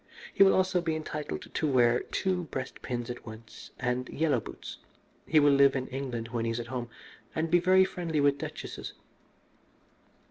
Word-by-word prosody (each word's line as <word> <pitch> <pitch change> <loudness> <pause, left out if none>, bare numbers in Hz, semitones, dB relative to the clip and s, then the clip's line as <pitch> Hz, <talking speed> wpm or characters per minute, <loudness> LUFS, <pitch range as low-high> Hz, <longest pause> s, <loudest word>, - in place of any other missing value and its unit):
He - - -1
will 195 -1 +8
also 185 -1 +2
be 165 -2 -1
entitled 150 -1 -4
to 155 - 0
wear 120 -1 +4
two 185 -2 -2
breast 130 -3 -6
pins 120 -1 -3
at 120 - -8
once 110 0 -11
and 125 0 -2
yellow 150 -5 +1
boots. - - -9 0.5
He 155 - +5
will 145 -1 +5
live 140 0 +5
in 130 -1 -1
England 125 -4 -4
when 115 -1 -2
he 115 - -1
is 115 +1 -2
at 120 - -4
home, 120 -2 -3 0.5
and 160 0 -1
be 175 - +6
very 185 +2 +5
friendly 170 -4 -2
with 140 -1 +3
duchesses. - - -6
140 Hz, 180 wpm, -29 LUFS, 120-160 Hz, 0.5 s, will